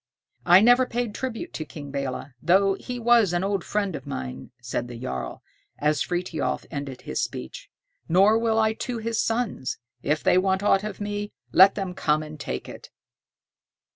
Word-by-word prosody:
"I 180 +2 +8
never 245 +3 +5
paid 240 -3 -2
tribute 260 +8 -5
to 155 - -4
King 145 -2 -9
Belé, 140 -1 -4
though 195 +5 +4
he 245 +5 -6
was 235 -5 +4
an 175 +1 +1
old 195 -2 -1
friend 200 -4 -1
of - - -8
mine," 65 - -6
said 120 0 -3
the 120 -1 -8
jarl, 115 - -5 0.3
as 150 0 +1
Frithiof 175 -2 -2
ended 140 -4 -5
his - - -3
speech, - - -6 0.4
"nor 195 +6 +5
will 225 -1 +1
I 220 0 +3
to 240 +2 -4
his 225 0 -1
sons. 225 - -1 0.2
If 150 +3 0
they 180 - +5
want 190 +1 +1
aught 195 -1 +3
of 210 -1 -6
me, 205 0 -4 0.2
let 190 +6 +7
them 195 -3 -3
come 155 -3 +1
and 155 0 -9
take 65 - -4
it." - - -10
190 Hz, 175 wpm, -25 LUFS, 150-220 Hz, 0.4 s, I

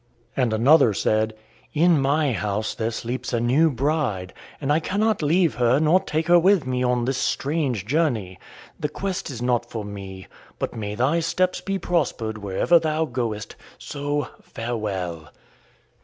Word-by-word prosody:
And 125 -4 +1
another 120 0 +5
said: 110 +2 +1 0.4
"In 165 -1 +4
my 145 +1 +2
house 105 0 -2
there 115 -1 -2
sleeps 120 +3 -4
a 120 - +2
new 135 +8 +3
bride, 130 - -1 0.3
and 145 0 +1
I 155 - +3
cannot 205 +5 0
leave 165 +1 +3
her 125 +2 +3
nor 160 +4 +4
take 155 -3 -2
her 175 +1 +6
with 185 -3 +3
me 125 -1 -1
on 125 -1 +1
this 130 0 -1
strange 140 - -1
journey. 115 - 0 0.4
This 150 - -1
quest 190 +4 -4
is 120 -3 -5
not 120 -1 0
for 110 -3 -5
me. 95 -2 -8 0.3
But - - -3
may 105 -2 -4
thy 135 +9 +2
steps 180 +3 0
be 195 0 -2
prospered 120 - -1
wherever 100 - +3
thou 160 0 0
goest. 115 -6 -4 0.2
So, 145 0 -3
farewell." 95 -8 -4
130 Hz, 155 wpm, -23 LUFS, 110-160 Hz, 0.4 s, her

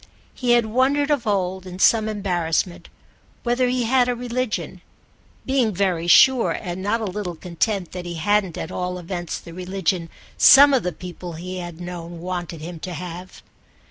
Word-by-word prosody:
He 245 -2 +1
had 240 -1 +4
wondered 270 +6 +1
of 275 -6 0
old, 190 -2 -1
in 180 0 -8
some 220 +3 +4
embarrassment, 180 -4 -2 0.5
whether 245 +1 +1
he 250 0 0
had 250 +1 +3
a 245 - 0
religion; 245 -1 -3 0.6
being 260 -4 +2
very 175 -3 0
sure, 255 +7 +6
and 180 -2 -5
not 215 +4 0
a - - -2
little 185 -2 -4
content, 180 +2 -2
that 180 -1 -6
he 170 - -5
hadn't 195 +1 +1
at - - -5
all 180 0 -3
events 175 -1 -5
the 170 - -12
religion 180 -1 -2 0.3
some 280 +1 +8
of 260 - +3
the 180 - -2
people 175 +1 -8
he 180 +3 -6
had 175 -2 -7
known 175 -1 -7
wanted 175 -2 -5
him 170 +1 -7
to 180 +2 -6
have. 180 +2 -8
185 Hz, 175 wpm, -22 LUFS, 175-230 Hz, 0.6 s, some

